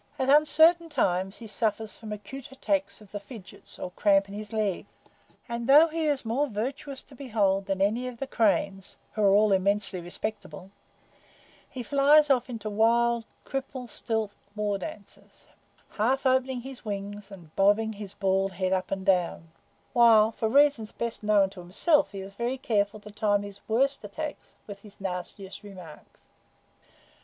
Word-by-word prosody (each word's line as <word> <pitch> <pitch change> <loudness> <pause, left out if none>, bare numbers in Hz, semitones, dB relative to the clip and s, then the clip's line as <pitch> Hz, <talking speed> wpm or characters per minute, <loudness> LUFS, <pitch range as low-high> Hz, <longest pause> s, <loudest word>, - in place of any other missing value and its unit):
At 265 -1 -1
uncertain 320 +3 +5
times 190 - 0
he 235 - -10
suffers 220 0 -1
from 220 -2 -10
acute 210 +7 -8
attacks 290 -1 -2
of 210 - -17
the 205 - -5
fidgets 200 -2 -11
or 180 - -6
cramp 195 +1 +3
in 200 - -10
his 210 0 -7
legs, 215 -4 -1 0.6
and 235 -1 -4
though 305 +4 +8
he 320 0 -1
is 285 -5 0
more 260 +6 0
virtuous 265 +5 -5
to 270 - -16
behold 205 -7 0
than 195 -1 0
any 230 +5 0
of 250 -2 -7
the 275 - -3
cranes, 200 -5 0 0.2
who 215 - -2
are 200 - +5
all 205 +1 +4
immensely 195 0 +1
respectable, 190 +1 -6 1.0
he 255 - -6
flies 290 +2 +5
off 250 -1 +2
into 225 -3 -6
wild, 230 +2 +2 0.2
cripple 265 -2 -5
stilt 220 -3 -2 0.2
war 205 -2 -1
dances, 200 +1 -11 0.4
half 255 +6 0
opening 260 -1 +2
his 265 0 -9
wings 205 -1 -6
and 175 -6 -14
bobbing 205 +3 +3
his 200 -1 -8
bald 195 -1 0
head 185 0 -1
up 185 -1 -1
and 190 -1 -3
down; 175 -4 +1 0.4
while 225 -3 +6
for 220 0 -2
reasons 275 -4 +3
best 235 -1 -4
known 210 -2 +4
to 195 - -12
himself 200 - +2
he 195 -2 -6
is 195 +1 -9
very 240 +5 -2
careful 215 -4 0
to 210 0 -12
time 205 -1 +1
his 200 0 -9
worst 270 +4 +1
attacks 295 +9 -7
with 200 -1 -9
his 205 -1 -15
nastiest 190 +1 -6
remarks. 185 -7 -13
215 Hz, 165 wpm, -27 LUFS, 195-255 Hz, 1.0 s, though